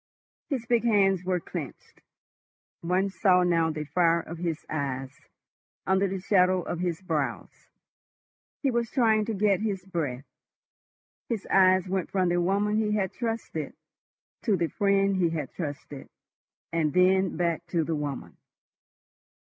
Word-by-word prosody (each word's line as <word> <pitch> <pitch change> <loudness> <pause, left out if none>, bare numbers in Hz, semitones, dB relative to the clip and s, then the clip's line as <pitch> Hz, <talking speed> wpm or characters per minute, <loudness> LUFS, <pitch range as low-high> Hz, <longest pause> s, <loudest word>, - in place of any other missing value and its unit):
His 260 -6 -2
big 235 -1 +2
hands 195 -5 +3
were 180 -1 0
clenched; 165 -5 -8 0.8
one 185 +3 0
saw 180 0 +3
now 165 -2 +2
the 155 -1 -3
fire 170 +2 +2
of 165 +1 -9
his 165 -3 -3
eyes 135 -3 -3 0.7
under 190 +1 +2
the 190 0 -3
shadow 185 -2 +3
of 170 - -4
his 175 0 -2
brows. 185 - -3 1.0
He 275 - +2
was 235 -1 -1
trying 220 -4 +2
to 225 - -3
get 200 -1 +2
his 200 -4 -3
breath. 150 -8 -3 1.0
His 225 -4 -2
eyes 185 -1 +5
went 185 -1 -2
from 185 -2 +1
the 175 0 +1
woman 200 +4 +1
he 215 -1 +1
had 190 -3 -1
trusted 230 -2 -4 0.7
to 210 -6 +1
the 170 -2 0
friend 195 -1 +2
he 175 -2 +2
had 155 -5 -4
trusted, 145 -3 -7 0.6
and 155 -3 +1
then 185 +1 +3
back 170 -1 -1
to 170 -1 0
the 160 +1 -2
woman. 145 -3 -5
185 Hz, 145 wpm, -27 LUFS, 165-200 Hz, 1.0 s, eyes